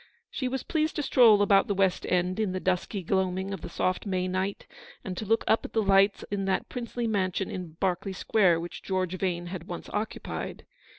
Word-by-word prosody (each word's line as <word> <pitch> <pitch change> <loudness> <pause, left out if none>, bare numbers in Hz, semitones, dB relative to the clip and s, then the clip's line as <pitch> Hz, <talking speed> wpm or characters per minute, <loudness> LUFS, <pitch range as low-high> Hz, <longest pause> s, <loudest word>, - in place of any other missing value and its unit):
She 260 - -2
was 260 0 -3
pleased 310 -1 0
to 300 - -1
stroll 225 -6 +6
about 200 -1 +4
the 200 - 0
West 190 -1 +1
End 180 +2 +1
in 210 -4 0
the 185 - -2
dusky 185 +2 -1
gloaming 190 +1 0
of 190 - -6
the - - -6
soft 185 +3 -1
May 185 -1 0
night, 190 +2 -2 0.4
and 185 - -4
to 215 +4 -5
look 225 +2 +2
up 220 - +3
at - - -8
the 220 - +2
lights 195 +1 +4
in 200 -1 -1
that 190 -1 -1
princely 240 -1 -4
mansion 195 -3 0
in 180 -4 -6
Berkeley 190 +1 -1
Square 180 -3 +3
which 175 - -7
George 185 -2 -1
Vane 175 -2 -1
had 175 -2 -6
once 175 - -6
54 210 - -1
occupied. 220 - -6
195 Hz, 215 wpm, -28 LUFS, 185-210 Hz, 0.4 s, stroll